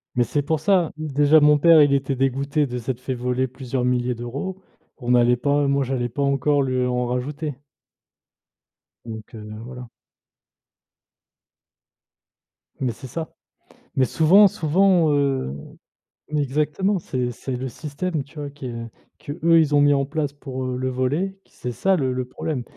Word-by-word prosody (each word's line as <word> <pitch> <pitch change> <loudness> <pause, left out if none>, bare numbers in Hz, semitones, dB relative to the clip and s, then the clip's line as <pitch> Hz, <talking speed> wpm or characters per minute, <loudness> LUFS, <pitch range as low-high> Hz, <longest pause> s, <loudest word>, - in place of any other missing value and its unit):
Mais 125 - +3
c'est 145 - 0
pour 155 +2 -1
ça, 185 -2 +2
déjà 150 0 +4
mon 150 0 +6
père, 165 +1 +7
il 145 -1 +4
était 135 0 0
dégoûté 135 +3 0
de 125 -1 -4
s'être 125 +1 -4
fait 130 +1 -3
voler 125 +1 -1
plusieurs 130 0 -4
milliers 125 0 0
d'euros. 140 +11 -5 0.4
On 125 -1 +1
allait 120 0 +4
pas 145 +2 +1
moi, 140 0 +2
j'allais 125 -2 -1
pas 130 +5 -4
encore 140 +1 +2
lui 130 -1 0
en 125 0 0
rajouter 140 +4 -3 1.5
donc, 110 -2 -7
heu, 115 - -8 0.3
voilà. 125 0 -9 2.9
Mais 130 -2 0
c'est 130 +4 -10
ça. 160 +4 -6 0.6
Mais 130 - +3
souvent 180 - +6
souvent, 175 0 +3
heu, 140 - 0 0.8
exactement, 150 +7 0
c'est 125 -6 -3
c'est 130 +2 -5
le 130 +2 -4
système, 155 +4 -4
tu 140 +3 -13
vois, 145 -1 -4
que 125 -5 -7 0.3
qu'eux 165 +3 +2
ils 150 -2 +2
ont 145 - +5
mis 145 0 +5
en 140 -1 +1
place 145 0 -2
pour, 130 -3 -6
heu, 125 0 -3
le 130 +1 -1
voler, 145 +10 -1
c'est 125 - -7
ça 190 +10 +1
le 130 -6 0
le 125 0 -2
problème. 130 +1 -4
140 Hz, 160 wpm, -23 LUFS, 125-150 Hz, 2.9 s, père